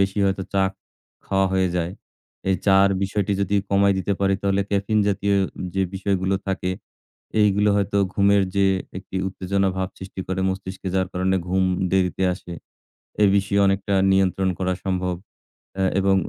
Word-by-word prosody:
বেশি 95 +1 +1
হয়তো 95 0 0
চা 95 -1 +2 0.6
খাওয়া 95 0 +2
হয়ে 95 -1 +2
যায়। 85 +1 -1 0.6
এই 95 - +3
চার 95 0 +6
বিষয়টি 100 0 0
যদি 100 +1 +1
কমায় 100 0 +4
দিতে 95 +2 -1
পারি, 95 0 +3
তাহলে 100 0 +1
ক্যাফেইন 100 +2 +1
জাতীয় 100 0 +1 0.4
যে 95 - +1
বিষয়গুলো 95 0 0
থাকে, 95 -1 -1 0.7
এইগুলো 105 0 +3
হয়তো 100 0 0 0.2
ঘুমের 100 0 +4
যে 100 0 +4 0.3
একটি 95 0 -9
উত্তেজনাভাব 95 0 -1
সৃষ্টি 95 0 -7
করে 95 0 -2
মস্তিষ্কে, 95 0 -5
যার 95 0 +1
কারণে 95 +1 +1
ঘুম 95 +1 +1 0.3
দেরিতে 95 0 +1
আসে। 90 -1 -9 0.7
এ - - +7
বিষয়ে 100 0 +1
অনেকটা 95 +1 0 0.2
নিয়ন্ত্রণ 95 0 +2
করা 95 0 0
সম্ভব। 90 -1 -1 0.6
অ্যা 95 0 0
এবং 95 0 +3
95 Hz, 150 wpm, -23 LUFS, 95-100 Hz, 0.7 s, এ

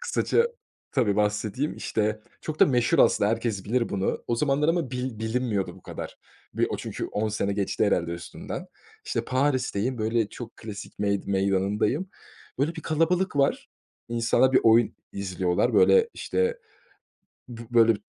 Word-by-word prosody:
kısaca, 475 -1 +2 0.5
tabii, 110 -7 +2
bahsedeyim, 105 +6 0
işte, 110 0 -1 0.2
çok 155 -1 -6
da - - +8
meşhur, 120 -4 +2
aslında 100 +1 +4
herkes 115 -4 -2
bilir 120 +1 0
bunu, 95 -1 -2
o 120 - 0
zamanlar 145 +3 +1
ama 165 -6 +1
bil 125 -3 -4
bilinmiyordu 110 -3 -1
bu - - -17
kadar. - - -7 0.4
Bir, - - +2
o - - -1
çünkü, - - -5
10 110 +1 -1
sene 100 -1 -1
geçti, 100 -1 0
herhâlde, 85 0 +1
üstünden. 85 0 -7 0.4
İşte, - - -2
Paris'teyim, 130 -3 0
böyle, 110 0 +1
çok 120 -2 -9
klasik 105 -2 -9
mey 100 -1 +1
meydanındayım. 100 - +1 0.5
Böyle 150 +5 0
bir 160 - -7
kalabalık 165 +2 +1
var. 140 0 +1 0.4
İnsanlar 120 +3 +2
bir 130 - +6
oyun 115 0 +4 0.2
izliyorlar. 95 -2 0
Böyle, 460 +1 +5
işte, 470 +1 -1 0.9
bi 115 -2 -8
böyle 115 -1 +5
115 Hz, 150 wpm, -26 LUFS, 105-140 Hz, 0.9 s, da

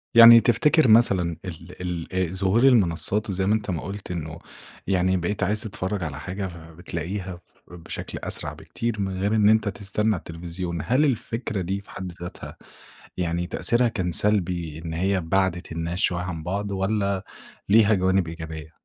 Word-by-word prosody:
يعني 115 0 +11
تفتكر 150 +6 +4
مثلًا 95 -7 +4
ال 90 0 -6
ال 95 -1 -1
ظهور 95 +6 +2
المنصّات 105 -3 +3
وزَي 95 0 -1
ما 105 - +3
أنت 105 -2 -2
ما 80 - -3
قُلت 100 +1 -7
إنه 80 -1 -5 0.5
يعني 95 -1 +2
بقيت 90 +4 -2
عايز 105 +3 +1
تتفرج 100 -3 -3
على 75 - -5
حاجة 95 +1 -4
فبتلاقيها 85 +2 -6
ف - - -23
بشكل 85 -1 -7
أسرع - - -1
بكتير، 115 -3 -4
من 95 -1 -3
غير 105 +2 +1
إن 105 -1 +5
أنت 110 -1 +3
تستنى 100 +2 -1
التلفزيون. 85 +1 -5
هل 130 - +3
الفكرة 115 -4 -2
دي 95 +3 -3
في - - -14
حد 95 -1 -6
ذاتها، 90 +1 -8 0.6
يعني 85 0 -1
تأثيرها 120 +6 +2
كان 90 -5 -2
سلبي، 85 -6 -1
إن 80 - -4
هي 95 +2 0
بَعدِت 90 0 0
الناس 85 +2 -3
شويّة 90 -4 +1
عن 85 -3 -5
بعض، 100 +3 -3
والّا 100 0 -1 0.5
ليها 110 +1 +6
جوانب 95 -2 +2
إيجابية؟ 80 -1 -7
95 Hz, 160 wpm, -24 LUFS, 85-105 Hz, 0.6 s, يعني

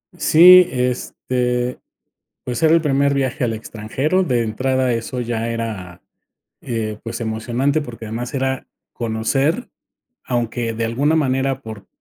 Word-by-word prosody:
Sí, 180 +2 +8
este, 125 0 -1 0.6
pues, 125 +5 -4
era 160 0 +5
el 165 - +5
primer 140 -1 +2
viaje 135 -1 -1
al 115 - -1
extranjero, 115 - -1
de 125 -7 +1
entrada 130 +3 0
eso 120 +2 -3
ya 115 -1 -2
era, 100 -7 -5 0.6
eh, 110 -3 -3
pues, 115 0 -6
emocionante, 120 +6 -1
porque 115 -5 -8
además 120 +4 -5
era 130 0 -1 0.3
conocer 135 - -1 0.6
aunque 120 -1 -1
de 115 0 -2
alguna 140 +8 +1
manera 135 -2 0
por 110 -2 -9
125 Hz, 130 wpm, -20 LUFS, 115-135 Hz, 0.6 s, Sí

